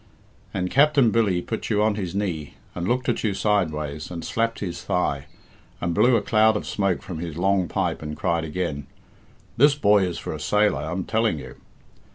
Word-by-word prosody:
And 90 -2 -2
Capt'n 140 -4 +4
Billy 100 -6 +1
put 110 - -4
you 105 -2 +2
on 110 0 +3
his 95 -3 -4
knee, 85 -8 -3 0.2
and 90 0 -3
looked 125 +2 0
at 120 - 0
you 105 -4 0
sideways, 80 -8 -1
and 85 -2 -6
slapped 115 -1 -1
his 90 -4 -5
thigh, 75 -5 -1 0.5
and 85 -1 -1
blew 120 +8 +4
a 110 - +1
cloud 110 0 +4
of - - -6
smoke 100 -3 -1
from 85 -4 -6
his 85 -2 -5
long 95 0 +2
pipe - - -1
and 75 0 -6
cried 85 -1 0
again, 75 -3 -3 0.7
'This 145 +3 +6
boy 105 -8 +4
is 90 -2 -3
for - - -5
a - - -6
sailor, 105 -3 +2
I'm 90 +5 -3
telling 110 -5 +1
you.' - - -9
95 Hz, 195 wpm, -24 LUFS, 85-110 Hz, 0.7 s, This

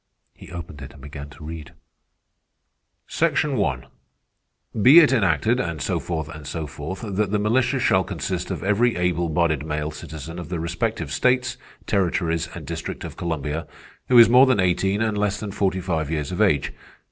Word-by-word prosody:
He - - -14
opened 85 -4 -8
it 65 - -9
and 70 - -15
began 70 0 -8
to 75 - -14
read: 80 -1 -8 1.3
"'Section 150 -3 0
One, 65 - -1 1.0
be 130 +10 +8
it 150 -5 +5
enacted, 110 - +2
and 85 -8 -3
so 65 - -1
forth 80 -3 -4
and 75 -3 -9
so 80 +1 -4
forth, 75 +6 -7
that 105 -1 -1
the 105 - +1
militia 120 +4 +1
shall - - +3
consist - - -4
of - - -4
every 110 +5 +2
able 90 -1 0
bodied 80 -2 +1
male 75 0 -3
citizen 80 +2 -8
of 85 - -8
the 90 -2 -3
respective 85 -1 -2
states, 125 - +1 0.3
territories, 85 -4 0
and - - -8
District - - -5
of - - -7
Columbia, 80 -1 -3 0.4
who 125 - +5
is 115 - +10
more 125 +3 +6
than 130 -5 +3
eighteen 95 +3 +1
and 110 -2 0
less 105 0 0
than 105 -2 -5
forty 95 -2 0
five 80 -5 -2
years 75 0 -2
of 90 - -2
age. 95 -10 +2
85 Hz, 180 wpm, -23 LUFS, 80-105 Hz, 1.3 s, is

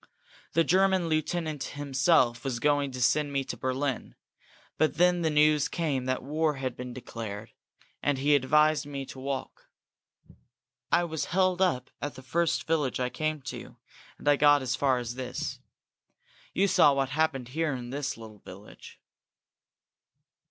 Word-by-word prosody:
The 165 - +4
German 190 -1 +3
lieutenant 155 -2 -1
himself 135 -3 +2
was 130 -4 -2
going 145 0 +2
to 130 -1 -6
send 150 +3 +2
me 140 -1 0
to - - -5
Berlin, 130 0 -3 0.6
but 155 0 +2
then 180 +1 +3
the 160 - +1
news 150 -1 +4
came 145 -7 -2
that 130 0 -1
war 155 +2 0
had 130 -2 -4
been 125 0 -7
declared, 115 -4 -7 0.5
and 145 -2 +1
he 145 +3 +2
advised 150 +2 +3
me 140 -1 -5
to 130 - -10
walk. 135 0 -5 1.2
I 175 - +4
was 160 -3 -3
held 185 0 +1
up 130 -9 +1
at 145 0 -4
the 130 - -11
first 170 +5 0
village 150 -6 0
I 125 -1 0
came 155 -2 -2
to, - - -8 0.4
and - - -10
I 145 -1 +5
got 145 -1 +5
as 130 0 -1
far 130 -1 +2
as 120 -1 -4
this. 125 0 -5 0.9
You 195 +2 +2
saw 180 -6 +5
what 135 -1 0
happened 140 -4 0
here 155 +1 -1
in 120 -1 -7
this 145 -1 -3
little 110 -2 -11
village." 100 +3 -13
145 Hz, 160 wpm, -28 LUFS, 130-155 Hz, 1.2 s, I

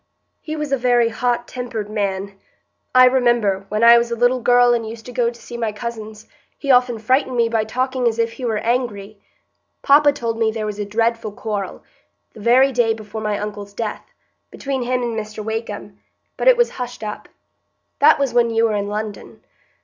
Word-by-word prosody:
"He 310 0 -5
was 300 -2 -4
a 275 - +2
very 240 -1 +3
hot 240 +1 -1
tempered 240 -4 -5
man. 200 -2 -3 0.6
I 255 0 +8
remember, 240 -6 +2
when 215 +2 -1
I 235 0 +8
was 235 0 -2
a 235 - -2
little 245 +2 +2
girl 245 0 +4
and 235 -1 0
used 225 0 -10
to 250 - -8
go 240 -1 +1
to 235 0 -12
see 240 - -9
my 225 -2 -1
cousins, 220 -1 -7 0.3
he 275 - 0
often 250 -2 +3
frightened 255 +3 0
me 235 -1 +3
by 225 -1 0
talking 255 +2 -1
as 225 -1 0
if 230 0 0
he 255 - -10
were 225 -3 0
angry. 215 -4 -2 0.6
Papa 290 +1 +6
told 230 -5 -4
me 225 -1 +2
there 220 -1 -4
was 210 -1 -5
a 205 - -2
dreadful 225 +1 -1
quarrel, 205 -2 -5 0.5
the - - -13
very 255 +5 +4
day 230 -3 +1
before 215 0 -8
my 210 -1 -1
uncle's 205 -1 -6
death, 215 0 -5 0.4
between 270 -2 -4
him 250 0 -1
and 235 -1 -2
Mr 215 -1 -6
Wakem, 215 -2 -5 0.4
but - - -2
it - - +7
was 480 0 +2
hushed 245 -2 -6
up. 210 0 -6 0.7
That - - +6
was 275 -4 -1
when 240 -1 +3
you 225 0 +2
were 220 -2 0
in 200 0 -2
London. 210 0 -6
230 Hz, 200 wpm, -20 LUFS, 215-245 Hz, 0.7 s, I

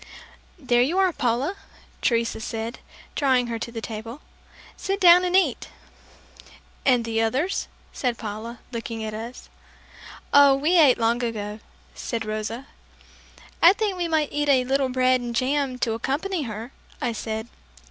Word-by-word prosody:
"There 245 -6 +2
you 300 +9 +1
are, 380 -2 +3
Paula," 255 +9 0 0.5
Teresa 230 -2 +1
said, 225 +2 -5 0.3
drawing 260 -3 +2
her 230 -1 -4
to 235 - -5
the 225 -1 -6
table; 225 +5 -7 0.5
"Sit 390 +1 -3
down 355 -1 +7
and 360 0 +1
eat!" 380 - +2 1.2
"And 245 -3 +4
the 225 0 0
others?" 265 - 0 0.3
said 245 -3 -1
Paula, 220 +2 -7
looking 230 -1 -5
at 215 0 -4
us. 230 +3 -7 0.9
"Oh, 285 -1 +7
we 315 +6 +3
ate 280 -6 +6
long 235 +1 +1
ago," 210 -2 -4 0.3
said 230 -2 -4
Rosa. 215 +4 -4 1.0
"I 345 +3 +8
think 415 -2 -1
we 350 -1 -2
might 315 -3 +1
eat 295 0 0
a 260 -2 +5
little 270 0 +1
bread 255 0 +2
and 240 -1 -5
jam 260 +1 0
to 235 -3 0
accompany 300 +10 -2
her," 220 +4 -7 0.3
I 245 - -1
said. 220 0 -4
250 Hz, 150 wpm, -24 LUFS, 230-290 Hz, 1.2 s, I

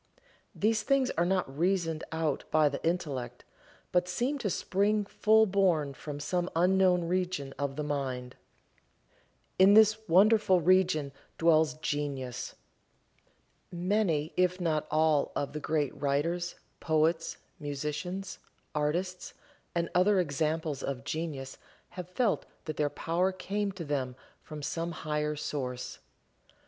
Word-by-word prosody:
These 215 +1 +2
things 265 +2 +2
are 170 +1 +1
not 180 -8 0
reasoned 170 -3 +1
out 160 -3 -1
by 155 -1 +4
the 140 - -6
intellect, 135 -8 -2 0.5
but 180 0 +2
seem 250 +10 -1
to 210 - -1
spring 205 +3 +1
full 220 +2 +4
born 180 -8 +2
from 145 +1 -7
some 175 +4 -1
unknown 180 0 +4
region 180 -6 -1
of 140 -1 -2
the 150 - -3
mind. 130 -4 -3 1.2
In 195 +2 +7
this 215 0 +6
wonderful 195 +1 +5
region 175 -4 +3 0.3
dwells 160 -2 +4
Genius. 135 -5 -3 1.2
Many, 175 -4 0
if 180 0 +2
not 160 -4 0
all 155 -2 +2
of 140 0 -2
the 150 - -3
great 150 -2 -1
writers, 165 +5 -1 0.2
poets, 160 +1 +1 0.2
musicians, 150 +6 -4 0.3
artists 175 +5 -2 0.4
and 170 0 +1
other 190 +2 +4
examples 155 -2 -1
of 135 -1 -4
genius 145 -3 -4 0.3
have 180 -1 -8
felt 210 +3 0 0.2
that 155 - -4
their 150 -1 +1
power 175 +5 0
came 200 +2 -2
to 180 -3 -6
them 135 -4 -2 0.3
from 150 -2 -9
some 165 +3 -2
higher 150 -1 -2
source. 130 -4 -4
165 Hz, 125 wpm, -30 LUFS, 145-185 Hz, 1.2 s, In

